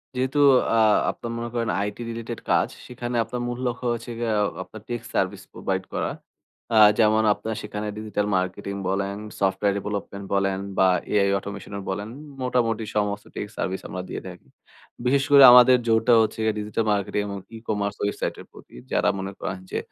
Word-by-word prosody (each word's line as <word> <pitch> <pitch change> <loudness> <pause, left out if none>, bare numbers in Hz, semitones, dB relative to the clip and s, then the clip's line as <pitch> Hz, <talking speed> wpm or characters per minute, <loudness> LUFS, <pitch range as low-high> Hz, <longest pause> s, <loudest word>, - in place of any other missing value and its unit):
যেহেতু 130 +3 0 0.4
আ - - +3 0.3
আপনার 115 - -7
মনে 120 0 -4
করেন 115 -2 -1
আইটি 105 +3 -4
রিলেটেড 115 0 -5
কাজ, - - +3 0.2
সেখানে 120 -1 -5
আপনার 120 +2 -5
মূল্য 120 +1 -4
লক্ষ্য 125 +1 -4
হয়েছে 120 0 -4
গিয়ে 115 -2 -1
আ - - +3 0.2
আপনার 110 - -12
টেক 120 -1 -3
সার্ভিস - - -1
প্রোভাইড 95 -1 -2
করা। - - -1 0.6
আ - - +3 0.2
যেমন 110 0 +4
আপনারা 110 +1 -5
সেখানে 105 0 -5
ডিজিটাল 105 -1 -2
মার্কেটিং 95 +2 -3
বলেন, 100 +1 -1 0.2
সফটওয়্যার 100 +1 +1
ডেভেলপমেন্ট 100 -1 -5
বলেন 95 -1 +1 0.2
বা 95 - +5 0.2
এআই 100 -1 +3
অটোমেশনও 100 0 -7
বলেন, 100 +3 -3 0.3
মোটামুটি 115 -3 0
সমস্ত 105 0 -1
টেক - - -4
সার্ভিস 95 +1 -2
আমরা 90 - -5
দিয়ে - - -5
থাকি। 90 -1 -11 0.6
বিশেষ 135 +2 +3
করে 140 -1 +9
আমাদের 125 +1 +8
জোরটা 115 +2 +4
হচ্ছে 110 0 -1
গিয়ে 110 - +2
ডিজিটাল 105 +1 -2
মার্কেটিং 100 0 0
এবং 100 0 -5 0.2
ই-কমার্স 105 -2 -2
ওয়েবসাইটের 100 - -3
প্রতি, - - -16 0.2
যারা - - +2
মনে 95 +1 -4
করেন 95 -1 -4
যে - - -1
105 Hz, 170 wpm, -24 LUFS, 100-120 Hz, 0.6 s, করে